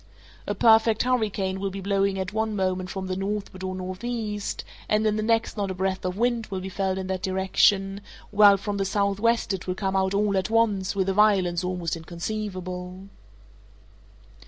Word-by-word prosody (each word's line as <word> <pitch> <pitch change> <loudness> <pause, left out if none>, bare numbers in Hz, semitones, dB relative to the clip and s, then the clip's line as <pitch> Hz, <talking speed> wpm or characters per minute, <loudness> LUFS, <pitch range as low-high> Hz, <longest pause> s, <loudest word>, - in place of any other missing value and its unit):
A 205 - -1
perfect 220 0 +5
hurricane 210 -6 0
will 195 0 -1
be 195 +1 -6
blowing 195 0 +1
at 190 +1 -3
one 220 0 -1
moment 185 -1 -1
from 190 -1 -4
the 185 0 -3
northward 195 -1 -4
or 185 0 -3
northeast, 210 +3 -4 0.3
and 215 +1 +2
in 215 -1 +2
the 215 - -1
next 225 +1 +1
not 200 -1 -1
a 190 - -3
breath 190 +1 -1
of 185 +1 -3
wind 235 0 0
will 190 -2 -4
be 190 +1 -6
felt 190 0 -1
in 190 - -3
that 185 -1 -3
direction, 195 +1 +2 0.3
while 205 -1 +7
from 200 +1 -3
the 195 - 0
southwest 205 +3 +1
it 190 -1 -5
will 180 - -1
come 195 0 -2
out 190 0 +1
all 205 0 +2
at 190 +2 -1
once 210 -4 +1
with 190 -1 0
a 195 - +1
violence 190 -4 +3
almost 180 -3 -2
inconceivable. 185 +1 -5
195 Hz, 185 wpm, -25 LUFS, 185-210 Hz, 0.3 s, while